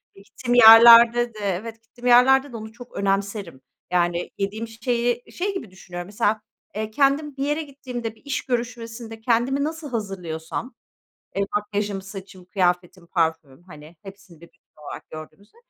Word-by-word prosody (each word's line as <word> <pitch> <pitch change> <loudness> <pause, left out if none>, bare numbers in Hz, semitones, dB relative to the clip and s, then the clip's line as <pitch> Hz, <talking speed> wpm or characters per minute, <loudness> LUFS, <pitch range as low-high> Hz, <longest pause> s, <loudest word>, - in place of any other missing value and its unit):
gittiğim 240 +5 -5
yerlerde 235 +1 +8
de 215 - -11
evet 210 +4 -4
gittiğim 240 +1 -8
yerlerde 265 +3 +5
de 235 - -7
onu 220 0 -9
çok 240 +2 -14
önemserim. 195 -6 -2 0.3
Yani, 175 -1 0
yediğim 205 +3 -3
şeyi 240 +1 -2
şey 390 +3 -3
gibi 300 - -7
düşünüyorum 175 -1 -9
mesela, 210 +2 -1 0.3
eee, 215 0 -4
kendim 280 +3 +1
bir 270 - -2
yere 295 +2 -1
gittiğimde 250 -6 -7
bir - - -24
iş 280 - -3
görüşmesinde 235 -2 -5
kendimi 245 +4 +1
nasıl 315 0 -5
hazırlıyorsam, 195 -1 -5 0.6
eee, 200 - +1
makyajım, 205 -1 -3
saçım, 190 -1 -11
kıyafetim, 180 -1 -1
parfümüm, 160 -4 -2
hani, 155 -2 -14
hepsini 195 -4 -14
bir 170 - -13
bütün - - -32 0.3
olarak - - -9
gördüğümüzde, 155 - -12
220 Hz, 150 wpm, -23 LUFS, 190-245 Hz, 0.6 s, yerlerde